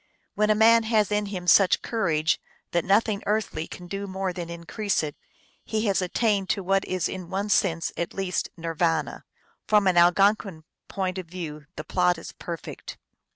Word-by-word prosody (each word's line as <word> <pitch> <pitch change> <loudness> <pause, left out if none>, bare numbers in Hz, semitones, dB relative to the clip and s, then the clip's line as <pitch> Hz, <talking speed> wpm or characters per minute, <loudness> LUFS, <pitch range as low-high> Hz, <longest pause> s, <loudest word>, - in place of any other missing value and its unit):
When 210 0 +1
a 215 - +4
man 230 +2 +6
has 215 -3 +2
in 210 0 0
him 185 -3 -5
such 185 +1 +5
cour 225 -6 -1
age 155 0 +1 0.3
that 170 -1 +1
nothing 200 +1 +2
earthly 210 -6 -1
can 180 - -10
do 195 +2 -5
more 190 -1 -3
than 175 -2 -6
increase 170 +4 -2
it, 150 -1 -4 0.5
he 220 0 -2
has 195 -2 +2
attained 195 +1 0
to 200 - 0
what 195 +1 +2
is 185 -1 -1
in 185 -2 -7
one 195 +2 -2
sense 175 -6 +1
at 170 - -4
least 190 -2 -2
Nir 165 0 -4
vana. 165 0 -1 0.4
From 210 -2 +4
an 185 -2 +3
Algonquin 185 0 +3 0.2
point 190 -1 -3
of 180 - -7
view 155 -4 -7
the 155 - -6
plot 180 0 +1
is 165 - -9
perfect. 170 -2 -8
190 Hz, 185 wpm, -25 LUFS, 170-205 Hz, 0.5 s, man